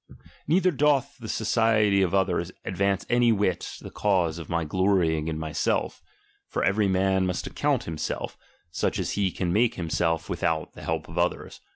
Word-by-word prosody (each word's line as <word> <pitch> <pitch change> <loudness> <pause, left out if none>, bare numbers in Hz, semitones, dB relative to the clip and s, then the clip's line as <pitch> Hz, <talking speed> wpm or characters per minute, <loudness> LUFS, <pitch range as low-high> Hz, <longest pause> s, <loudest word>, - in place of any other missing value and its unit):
Neither 185 +4 +3
doth 140 -3 +1
the 110 -2 -8
society 110 -3 +2
of 90 -3 +2
others 90 -2 +1
advance 95 +1 0
any 120 -1 +4
whit 100 -5 0
the - - -9
cause 90 -5 +1
of 80 - -9
My 85 -2 0
glorying 85 -3 +1
in 80 -1 -2
myself; 80 -1 -1 0.5
for - - -2
every 100 +1 +2
man 95 0 +2
must 90 - -2
ac - - -7
count - - +1
himself, 80 -2 -4 0.4
such - - -1
as - - -2
he 100 -2 +1
can 90 -1 -2
make 115 +2 +2
himself 80 -1 -1
with - - -4
out 80 0 0
the - - -12
help 80 -2 -3
of 80 +2 -5
others. 90 +1 -2
95 Hz, 180 wpm, -26 LUFS, 85-105 Hz, 0.5 s, any